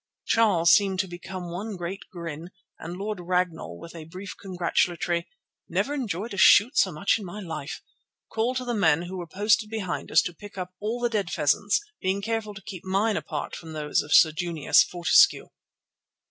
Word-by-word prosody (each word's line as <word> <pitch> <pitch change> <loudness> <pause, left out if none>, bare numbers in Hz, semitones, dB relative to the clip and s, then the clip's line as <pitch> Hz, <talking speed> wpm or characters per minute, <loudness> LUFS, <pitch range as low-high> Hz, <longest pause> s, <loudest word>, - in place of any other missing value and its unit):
Charles 190 -8 +4
seemed 195 -2 +4
to 190 - -7
become 175 0 -7
one 200 +4 -5
great 180 +2 -5
grin, 170 -2 -7 0.3
and 175 +2 -7
Lord 205 0 -4
Ragnall, 175 - -2
with 165 - -11
a 165 -2 -9
brief 185 +4 -8
congratulatory 175 -2 -1 0.4
"Never 285 - 0
enjoyed 225 - -3
a - - -6
shoot 215 +7 +6
so 190 - +3
much 175 +8 +1
in - - -8
my 190 +3 -7
life," 160 -7 -6 0.4
called 235 +3 -1
to 255 - -3
the 240 - -2
men 165 -7 +3
who 185 +2 -6
were 175 -2 -6
posted 210 +4 +1
behind 215 -5 -4
us - - +5
to 175 - -4
pick 205 +4 -12
up 180 -1 -5
all 220 +4 -2
the 240 - +1
dead 210 -6 -1
pheasants, 175 +8 +2 0.2
being 190 +1 0
careful 225 -2 -2
to 195 - -11
keep 190 -4 -8
mine 200 +3 +1
apart 150 -1 -4
from 160 -1 -9
those 150 -1 0
of 145 - -10
Sir 160 - +7
Junius 165 -2 +3
Fortescue. 175 -1 +3
185 Hz, 190 wpm, -26 LUFS, 170-205 Hz, 0.4 s, Sir